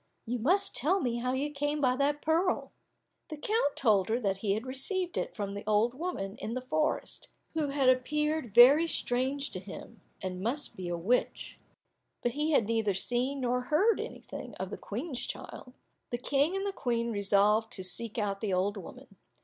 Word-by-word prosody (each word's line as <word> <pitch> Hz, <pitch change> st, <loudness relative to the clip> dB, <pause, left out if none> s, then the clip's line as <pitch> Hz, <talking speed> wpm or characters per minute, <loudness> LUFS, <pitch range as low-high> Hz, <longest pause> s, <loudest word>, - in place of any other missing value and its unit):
You 245 Hz, +1 st, -2 dB
must 370 Hz, -, +2 dB
tell 370 Hz, +7 st, +2 dB
me 245 Hz, -6 st, -1 dB
how 250 Hz, +2 st, -1 dB
you 285 Hz, +3 st, -1 dB
came 290 Hz, +1 st, -1 dB
by 255 Hz, -3 st, +3 dB
that 290 Hz, +1 st, 0 dB
pearl." 335 Hz, +4 st, +1 dB, 0.6 s
The 310 Hz, -, -6 dB
count 360 Hz, -4 st, 0 dB
told 210 Hz, -7 st, +3 dB
her 230 Hz, +2 st, +1 dB
that 195 Hz, -5 st, 0 dB
he 195 Hz, 0 st, 0 dB
had 220 Hz, +4 st, -3 dB
received 345 Hz, +8 st, -2 dB
it -, -, -3 dB
from 200 Hz, -3 st, -3 dB
the 200 Hz, -, -6 dB
old 215 Hz, +3 st, +3 dB
woman 255 Hz, -, -4 dB
in 225 Hz, -, -4 dB
the 255 Hz, -, -2 dB
forest, 310 Hz, +4 st, -1 dB, 0.3 s
who 315 Hz, -2 st, 0 dB
had 275 Hz, -1 st, +1 dB
appeared 300 Hz, -1 st, +1 dB
very 280 Hz, +7 st, +8 dB
strange 270 Hz, 0 st, 0 dB
to 185 Hz, -, -4 dB
him, 205 Hz, +4 st, -10 dB, 0.2 s
and 185 Hz, -1 st, -5 dB
must 255 Hz, +8 st, -1 dB
be 180 Hz, -2 st, -5 dB
a 175 Hz, -, -2 dB
witch, 225 Hz, +9 st, -1 dB, 0.6 s
but 240 Hz, -, +1 dB
he 300 Hz, +4 st, 0 dB
had 280 Hz, -8 st, +4 dB
neither 220 Hz, -3 st, +1 dB
seen 250 Hz, +7 st, 0 dB
nor 250 Hz, 0 st, 0 dB
hear 390 Hz, -, +3 dB
anything -, -, -7 dB
of -, -, -5 dB
the -, -, -4 dB
Queen's 255 Hz, +5 st, -4 dB
child. 250 Hz, -, -7 dB, 0.4 s
The 240 Hz, -, -2 dB
King 280 Hz, +7 st, +1 dB
and 390 Hz, +1 st, -1 dB
the 400 Hz, -, -1 dB
Queen 235 Hz, -6 st, -1 dB
resolved 210 Hz, +2 st, +2 dB
to 190 Hz, -, -5 dB
seek 215 Hz, +5 st, -2 dB
out 200 Hz, -2 st, -1 dB
the 210 Hz, -4 st, -1 dB
old 200 Hz, +3 st, 0 dB
woman. 190 Hz, -, -11 dB
250 Hz, 190 wpm, -30 LUFS, 210-295 Hz, 0.6 s, very